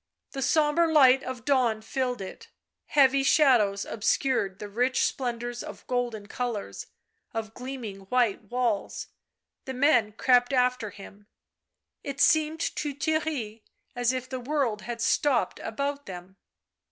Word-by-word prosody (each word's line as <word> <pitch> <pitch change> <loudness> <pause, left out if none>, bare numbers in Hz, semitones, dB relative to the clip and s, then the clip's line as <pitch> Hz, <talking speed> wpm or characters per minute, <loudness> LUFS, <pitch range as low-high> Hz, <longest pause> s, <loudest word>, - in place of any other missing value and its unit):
The 270 - -5
sombre 315 +4 +3
light 270 -4 +6
of 250 -3 -7
dawn 240 -6 +2
filled 250 -1 -2
it; 190 - -9 0.4
heavy 275 -1 +4
shadows 245 -9 +3
obscured 210 -3 0
the 210 - -7
rich 245 +5 0
splendours 240 -1 -2
of - - -9
golden 240 -4 -2
colours, 230 -1 -4 0.5
of 220 -1 -4
gleaming 235 -7 -7
white 240 -4 +1
walls; 235 -2 -2 0.6
the 265 - -5
men 245 -6 +3
crept 245 +3 +3
after 250 -3 +1
him 200 +1 -13 0.4
— - - -59 0.3
it 280 -1 -6
seemed 315 +1 +3 0.2
to 290 -2 -3
Theirry 285 -8 -2 0.3
as 245 0 +2
if 255 -1 -4
the 260 0 -5
world 250 -5 -1
had 230 +3 -6
stopped 265 0 +1
about 280 +5 -4
them. 185 +1 -9
250 Hz, 135 wpm, -27 LUFS, 220-275 Hz, 0.6 s, light